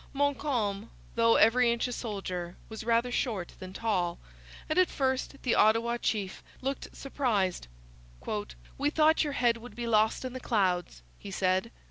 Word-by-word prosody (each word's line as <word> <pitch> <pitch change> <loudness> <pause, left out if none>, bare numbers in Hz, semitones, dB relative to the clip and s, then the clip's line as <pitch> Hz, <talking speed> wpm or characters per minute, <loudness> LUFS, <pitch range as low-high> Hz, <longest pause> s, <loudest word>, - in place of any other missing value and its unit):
Montcalm, 260 -7 0 0.2
though 230 0 +4
every 235 +2 +5
inch 235 +1 0
a - - -5
soldier, 185 -6 -4
was 220 -1 -7
rather 235 +2 +2
short 215 -8 -2
than 185 0 -8
tall; 185 -5 -1 0.5
and 310 +4 +2
at 370 - +4
first 265 0 -1
the 250 - +2
Ottawa 230 +2 +3
chief 205 -5 -2 0.2
looked 270 +1 -4
surprised. 215 - -1 0.6
'We 215 +6 -3
thought 315 +1 +4
your 295 -2 -2
head 240 -3 +2
would 245 +2 -11
be 240 - -4
lost 220 +2 +2
in 255 - -4
the 255 - -5
clouds,' 180 - 0 0.2
he 200 - -8
said. 190 +2 +1
230 Hz, 155 wpm, -30 LUFS, 200-255 Hz, 0.6 s, every